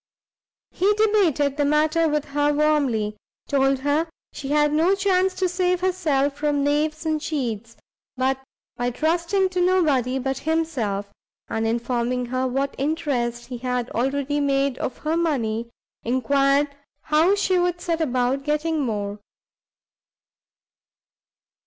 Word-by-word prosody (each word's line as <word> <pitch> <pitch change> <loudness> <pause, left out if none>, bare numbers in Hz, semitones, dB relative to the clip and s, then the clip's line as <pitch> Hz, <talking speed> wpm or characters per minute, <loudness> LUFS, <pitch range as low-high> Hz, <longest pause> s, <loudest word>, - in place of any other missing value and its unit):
He 390 +3 +2
debated 365 -10 +2
the 290 - +2
matter 310 +3 +2
with 300 -1 0
her 290 0 +2
warmly, 280 -9 +1 0.3
told 270 -1 +2
her 290 +4 +1 0.3
she 275 - -6
had 295 +1 +2
no 335 +5 +3
chance 380 -1 +1
to 375 - +1
save 360 0 0
herself 305 -7 +1
from 290 -1 0
knaves 300 +2 0
and 310 -1 0
cheats, 230 -7 -3 0.4
but 260 +1 +1 0.4
by 245 0 -1
trusting 340 +8 +1
to 365 -1 -1
nobody 295 -9 +2
but 270 0 -2
himself, 245 -12 -2 0.4
and 225 0 -1
informing 240 +2 -1
her 255 +1 -1
what 270 +2 -1
interest 270 -6 -1
he 250 -2 -7
had 250 -1 -2
already 280 +4 -1
made 275 -2 +1
of 255 - -3
her 310 +1 -1
money, 235 -9 -1 0.3
enquired 275 +3 +2 0.3
how 320 +6 +3
she 380 -2 +1
would 355 0 0
set 335 -1 -2
about 255 -2 0
getting 305 +2 0
more? 210 -6 -2
290 Hz, 130 wpm, -23 LUFS, 255-325 Hz, 0.4 s, no